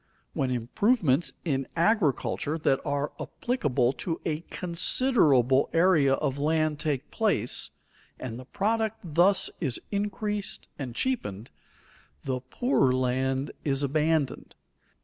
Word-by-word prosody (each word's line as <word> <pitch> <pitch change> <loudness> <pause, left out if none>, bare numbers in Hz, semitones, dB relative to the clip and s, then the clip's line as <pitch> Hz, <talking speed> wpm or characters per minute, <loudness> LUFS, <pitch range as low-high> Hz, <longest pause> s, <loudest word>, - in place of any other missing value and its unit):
When 135 - 0
improvements 140 - +1
in 135 -5 -1
agriculture 165 - +1
that 135 -4 +1
are 145 -1 -1
applicable 140 - 0
to 165 +3 -4
a 155 -2 -1
considerable 165 - +2
area 165 -5 +4
of 135 +1 -2
land 155 0 +1
take 150 -3 -2
place, 200 - 0 0.5
and 120 -2 -6
the 130 - -10
product 220 - -1
thus 175 +4 +3
is 135 -8 0
increased 205 0 -2
and 125 -4 -5
cheapened, 120 - -2 0.7
the 130 -1 -2
poorer 135 - +1
land 130 +2 0
is 140 -1 0
abandoned. 150 0 0
150 Hz, 110 wpm, -27 LUFS, 130-190 Hz, 0.7 s, area